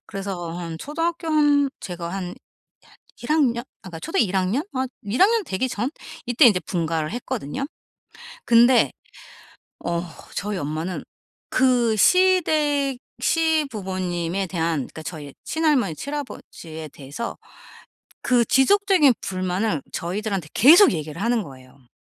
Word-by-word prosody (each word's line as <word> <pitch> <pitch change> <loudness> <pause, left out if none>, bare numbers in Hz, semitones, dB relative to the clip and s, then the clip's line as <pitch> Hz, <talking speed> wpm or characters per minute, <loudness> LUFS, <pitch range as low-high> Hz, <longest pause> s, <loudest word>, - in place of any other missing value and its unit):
그래서 190 -4 -5
한 165 -2 -5
초등학교 330 - -3
한 290 -2 +3
제가 175 -2 -6
한 180 0 -5 0.9
1 - - -7
학년? 260 -7 +2 0.2
아 190 - -9
그러니까 165 - -7
초등 325 - 0
1 195 -3 0
학년? 190 +9 +1
아 260 0 -1 0.2
1 205 +5 -1
학년 440 +3 +5
되기 255 - -2
전? 240 +4 -2 0.3
이때 245 +3 +4
인제 205 -6 +6
분가를 165 -3 -2
했거든요. 240 - -4 0.8
근데 240 +2 +5 0.9
어 170 0 0 0.3
저희 205 0 -3
엄마는 160 +4 -4 0.5
그 250 -3 +3
시댁 305 - +3 0.2
시부모님에 195 - 0
대한 170 -2 -1
그러니까 140 +4 -6
저희 150 -4 -8
친할머니 295 - +1
친할아버지에 170 - -7
대해서 145 +11 -7 0.9
그 245 -3 +3
지속적인 370 -1 +4
불만을 185 -3 -1
저희들한테 195 -1 -3
계속 335 - +8
얘기를 155 0 -5
하는 230 +1 +1
거예요. 130 -3 -15
210 Hz, 275 characters per minute, -23 LUFS, 170-285 Hz, 0.9 s, 계속